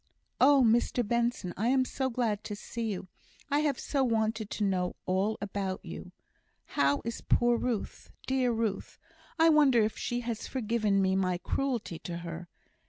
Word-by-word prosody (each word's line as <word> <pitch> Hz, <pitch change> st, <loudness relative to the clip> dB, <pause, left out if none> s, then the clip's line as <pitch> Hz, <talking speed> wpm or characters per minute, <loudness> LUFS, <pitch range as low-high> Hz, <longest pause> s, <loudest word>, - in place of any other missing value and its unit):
"Oh, 275 Hz, 0 st, +6 dB
Mr 235 Hz, 0 st, +2 dB
Benson, 235 Hz, -6 st, 0 dB
I 220 Hz, +5 st, -1 dB
am 260 Hz, +1 st, +3 dB
so 265 Hz, 0 st, -2 dB
glad 230 Hz, -4 st, -1 dB
to 210 Hz, -, -4 dB
see 225 Hz, +1 st, -4 dB
you! 185 Hz, -1 st, -5 dB, 0.4 s
I 290 Hz, -, +3 dB
have 295 Hz, -3 st, 0 dB
so 275 Hz, -2 st, 0 dB
wanted 220 Hz, -3 st, 0 dB
to 210 Hz, -, -2 dB
know 185 Hz, -2 st, 0 dB
all 190 Hz, +4 st, 0 dB
about 195 Hz, -2 st, -3 dB
you! -, -, -8 dB, 0.5 s
How 140 Hz, 0 st, +1 dB
is 230 Hz, 0 st, -4 dB
poor 240 Hz, 0 st, +3 dB
Ruth? 235 Hz, -2 st, -3 dB, 0.2 s
dear 260 Hz, -2 st, +1 dB
Ruth! 225 Hz, -3 st, -2 dB, 0.4 s
I 325 Hz, 0 st, +6 dB
wonder 280 Hz, -7 st, +5 dB
if 215 Hz, -, -1 dB
she 245 Hz, 0 st, -2 dB
has 235 Hz, -2 st, -4 dB
forgiven 215 Hz, -5 st, +1 dB
me 190 Hz, 0 st, +2 dB
my 185 Hz, -2 st, +1 dB
cruelty 235 Hz, -5 st, -2 dB
to 170 Hz, -1 st, -5 dB
her? 170 Hz, 0 st, -7 dB
225 Hz, 170 wpm, -30 LUFS, 195-250 Hz, 0.5 s, Oh